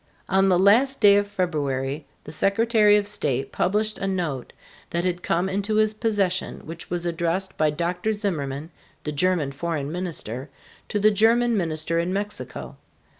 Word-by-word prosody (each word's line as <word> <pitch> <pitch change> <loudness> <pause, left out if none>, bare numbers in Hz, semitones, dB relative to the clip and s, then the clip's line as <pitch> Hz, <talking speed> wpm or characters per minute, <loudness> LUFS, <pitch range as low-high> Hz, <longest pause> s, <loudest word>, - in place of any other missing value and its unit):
On 195 0 +4
the 180 - +4
last 230 +9 +4
day 205 -2 +7
of 205 0 +1
February, 145 -7 -2 0.2
the - - -9
Secretary 210 - +3
of 205 - 0
State 135 -10 -1
published 210 +3 0
a 195 - -2
note 170 -9 -2 0.4
that 170 +1 -1
had 180 -1 -1
come 175 +2 0
into 200 +3 -1
his 215 0 +3
possession 205 -5 -1
which 165 +2 -8
was 175 0 -3
addressed 170 +3 -1
by 155 -1 +2
Dr. 175 +7 -1
Zimmerman, 160 -8 -3 0.3
the 150 - -3
German 155 -2 +1
foreign 145 0 -3
minister, 155 - -4 0.4
to 210 - 0
the 215 +1 +5
German 230 +3 +3
minister 165 -3 0
in 170 +2 -1
Mexico. 205 +2 -5
180 Hz, 160 wpm, -24 LUFS, 155-205 Hz, 0.4 s, day